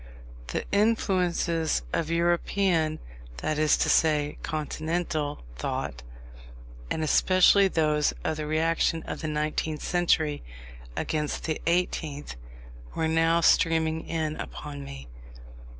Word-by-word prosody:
The - - -3
influences 180 - +1
of 165 - 0
European, 170 -1 +1 0.4
that 150 - -2
is 155 -1 +4
to - - +1
say, 150 -2 +2
Continental, 155 -1 -3
thought, - - -3 0.9
and 160 - -1
especially 185 +5 +5
those 150 -4 +2
of 160 - -1
the 155 -1 -4
reaction 165 +1 +1
of - - -6
the 155 - -3
nineteenth 150 0 -2
century 160 -4 +1 0.6
against 150 -2 -2
the 155 -2 -2
eighteenth, 160 - -1 0.6
were 160 - 0
now 165 +1 +3
streaming 160 -1 +2
in 155 -2 -2
upon 145 -1 -7
me. 65 - -9
160 Hz, 110 wpm, -27 LUFS, 150-170 Hz, 0.9 s, especially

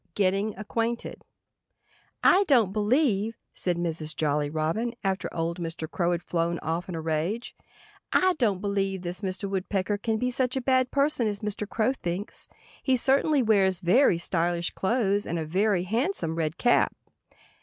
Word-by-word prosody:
*II* 185 - -41
*GETTING 200 +2 +1
ACQUAINTED* 230 +2 -3 1.0
"I 385 +2 +6
don't 230 -9 +4
believe—" 220 -1 +1 0.2
said 175 -2 -2
Mrs. 160 -2 -2
Jolly 150 -1 0
Robin 165 +11 -1
after 190 -1 -1
old 170 +1 -2
Mr. 165 -1 -4
Crow 175 +2 0
had 175 0 -1
flown 170 0 -1
off 165 +3 -2
in 175 - -4
a 160 - -3
rage—"I 190 - -2
don't 205 -7 +1
believe 195 -2 -1
this 180 +2 -4
Mr. 190 0 -3
Woodpecker 195 +1 -1
can 220 +1 0
be 250 +3 -1
such 255 0 0
a - - +2
bad 255 0 +2
person 280 -4 +1
as 205 -1 -3
Mr. 210 -1 -3
Crow 230 +3 +1
thinks. 185 -4 -5 0.3
He 260 -2 +2
certainly 275 +3 +3
wears 195 -5 +3
very 185 +2 +4
stylish 170 0 0
clothes 205 -1 0
and 170 - -2
a 160 - -2
very 190 +3 +1
handsome 225 - -1
red 160 0 -2
cap." 240 +4 +3
195 Hz, 160 wpm, -27 LUFS, 170-230 Hz, 1.0 s, I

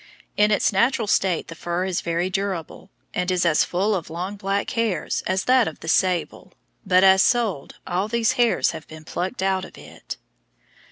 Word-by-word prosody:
In 210 0 +4
its 210 0 +2
natural 235 +3 +2
state 190 -4 +1
the 165 - -8
fur 175 +2 -3
is 185 -2 -2
very 170 +1 -1
durable, 190 -3 -4 0.2
and 180 0 -1
is 180 -1 +1
as 160 -3 +4
full 195 +4 0
of 180 -5 -3
long 180 +5 -5
black 200 0 -2
hairs 230 -4 -1
as 190 +1 0
that 255 -2 +4
of 160 - -7
the - - -9
sable, 180 +1 0 0.3
but 185 -2 +4
as 190 0 +6
sold, 215 - 0
all 185 +3 -1
these 230 0 +1
hairs 240 -2 +2
have 155 - -9
been 155 0 -11
plucked 185 +6 -4
out 190 -1 +1
of - - -11
it. - - -10
190 Hz, 185 wpm, -23 LUFS, 175-210 Hz, 0.3 s, as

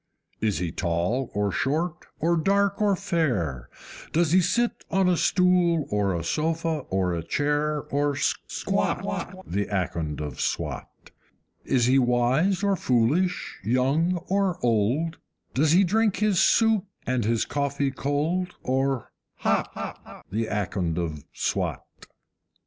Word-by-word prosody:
Is 105 -3 0
he 85 -2 -2
tall 90 +11 -1
or 105 -1 +1
short, 160 - -1
or 170 +2 +2
dark 200 +4 +1
or 205 -2 +3
fair? 125 - -1 0.4
Does 165 -1 +2
he 185 +2 +6
sit 235 +7 0
on 190 -1 +2
a 180 - +4
stool 180 -3 +3
or 100 -3 +1
a 85 - -3
sofa 160 - -1
or 90 -3 0
chair, 150 - 0
or 145 0 0
SQUAT, 140 - -2
The 100 +6 -2
Akond 85 -6 -2
of 75 -4 -5
Swat? - - -4 0.5
Is 125 -3 +2
he 130 +2 +4
wise 130 +10 +2
or 200 -1 +3
foolish, 145 +6 +1
young 135 - +2
or 195 -2 +1
old? 120 +9 +1 0.3
Does 150 +4 +3
he 190 +3 +6
drink 215 +3 +2
his 205 -3 +2
soup 225 -3 +4 0.2
and 125 -2 0
his 115 +1 +1
coffee 140 -1 -1
cold, 155 +7 -1
or 135 -1 0 0.2
HOT, - - -3
The 110 +2 -1
Akond 95 -5 -2
of 80 -4 -3
Swat? - - -2
145 Hz, 130 wpm, -25 LUFS, -, 0.5 s, he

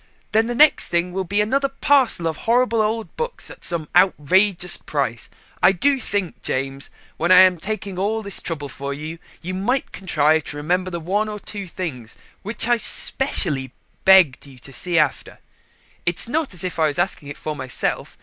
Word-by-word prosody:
Then 220 +1 +2
the 240 - -3
next 300 +3 +6
thing 175 +1 0
will 190 0 -2
be 205 +4 +1
another 275 +6 0
parcel 265 -10 +2
of 160 -2 -3
horrible 235 -1 +1
old 220 +1 -2
books 475 +1 -5
at - - -13
some 165 -3 0
outrageous 180 +1 +3
price. 125 -7 -3 0.3
I 195 - +5
do 275 +8 +2
think, 200 -6 -3
James, 135 +1 -2 0.3
when 170 +3 0
I 185 0 +9
am 185 -1 +5
taking 195 0 -5
all 220 +3 -1
this 200 -2 -3
trouble 150 -4 -5
for 140 0 -6
you, 155 +3 -7 0.2
you 185 +2 -4
might 225 +9 -1
contrive 160 -4 +1
to 145 - -7
remember 180 +5 -1
the 170 -2 -5
one 200 +6 -1
or 210 - -5
two 200 -1 -7
things 135 -11 -6 0.3
which 210 +3 +2
I 240 0 +3
specially 160 - 0 0.3
begged 185 -9 +5
you 135 -2 -15
to 135 +3 -12
see 175 +3 0
after. 150 -4 0 0.7
It's 175 +3 0
not 295 - -2
as 175 - -2
if 180 -2 -4
I 160 - +4
was 145 - -3
asking 145 - -1
it 145 - -8
for 155 -1 -5
myself. 130 -3 -3
185 Hz, 190 wpm, -21 LUFS, 155-215 Hz, 0.7 s, I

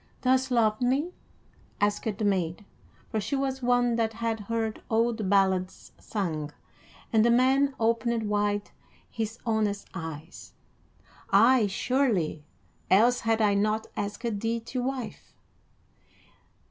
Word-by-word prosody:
"Dost 260 +1 +2
love 220 -3 +2
me?" 275 +8 +1 0.7
asked 205 0 0
the 215 - -1
maid, 185 -1 -1 0.5
for 220 - -1
she 280 - -2
was 270 -1 -2
one 245 -1 +2
that 225 -1 0
had 225 0 -2
heard 220 +1 -3
old 225 -2 +1
ballads 190 -2 +1
sung; 160 -8 -3 0.6
and 220 -1 +5
the 235 - +4
man 265 +3 +3
opened 230 0 +1
wide 205 0 0 0.4
his 225 0 -4
honest 215 -3 0
eyes. 160 0 -8 0.8
"Ay, 230 +2 +5
surely, 200 - 0 0.5
else 235 +6 +5
had 225 -1 +1
I 205 -1 +4
not 215 +2 +1
asked 205 +1 -3
thee 230 +2 -1
to 250 +2 -4
wife." 260 -1 -5
225 Hz, 120 wpm, -27 LUFS, 205-245 Hz, 0.8 s, and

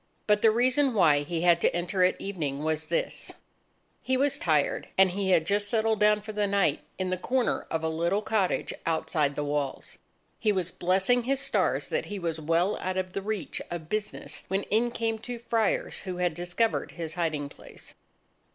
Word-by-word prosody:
But 210 0 +3
the 225 - +6
reason 255 +3 +2
why 155 -7 +5
he 165 +3 -3
had 170 -1 +4
to - - +2
enter 180 +2 0
at 180 - +2
evening, 150 -8 -3
was 155 0 -1
this: - - -2 0.7
He 260 0 +1
was 280 +1 +2
tired, 155 -4 +1
and 190 -1 +6
he 195 +1 -1
had 165 -4 +4
just 205 +2 0
settled 220 -1 +1
down 210 0 +4
for 215 +1 -7
the 210 -1 0
night 200 -1 +2 0.2
in 185 0 -2
the 185 - 0
corner 250 +5 0
of 160 0 -2
a - - +1
little 170 +6 0
cottage 210 -4 0
outside 155 -3 0
the 150 - -2
walls. 145 -2 -3 0.4
He 215 - +2
was 185 -3 -1
blessing 190 +9 +2
his 270 +1 +1
stars 275 -1 0
that - - -1
he 205 - -5
was 165 -3 -3
well 165 +5 +1
out 185 0 -3
of 185 -1 -2
the 195 - -2
reach 210 -1 -3
of 165 -2 -6
business, 215 +1 -4
when 195 +1 -1
in 235 +3 +3
came 225 -1 -2
two 245 +2 -6
Friars, 230 -2 0
who 185 -2 -5
had 180 -2 +1
discovered 175 +7 -1
his 165 -2 -5
hiding 155 -4 -1
place. - - -12
190 Hz, 195 wpm, -28 LUFS, 165-215 Hz, 0.7 s, the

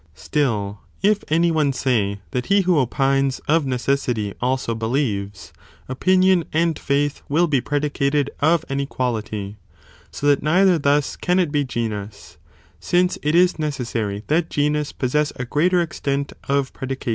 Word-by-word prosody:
Still, 100 - -1 0.2
if 210 +1 +3
any 165 +2 +2
one 155 -3 +2
say, 110 -7 0
that 125 - -3
he 200 0 +4
who 180 -4 +2
opines, 135 +1 +1
of 155 -1 +2
necessity 125 -5 -1
also 125 -1 0
believes, 110 -4 -2 0.3
opinion 185 +6 +3
and 165 0 +1
faith 145 +1 0
will 160 +5 +3
be 145 -6 +1
predicated 145 0 0
of 160 +2 +2
an 135 0 -2
equality, 110 -7 -3 0.5
so - - -6
that 145 -1 +4
neither 180 +3 +3
thus 145 0 +1
can 180 +1 0
it 175 -5 +1
be 145 -1 +1
genus, 110 -5 -5 0.4
since 180 +1 +1
it 150 +2 0
is 180 -1 +4
necessary 115 -9 -3
that 160 +2 +1
genus 150 0 0
possess 150 +3 0
a 125 - -4
greater 175 +7 +2
extent 140 -3 -3 0.2
of 140 -1 0
predication. 135 -1 -5
140 Hz, 145 wpm, -21 LUFS, 125-155 Hz, 0.5 s, he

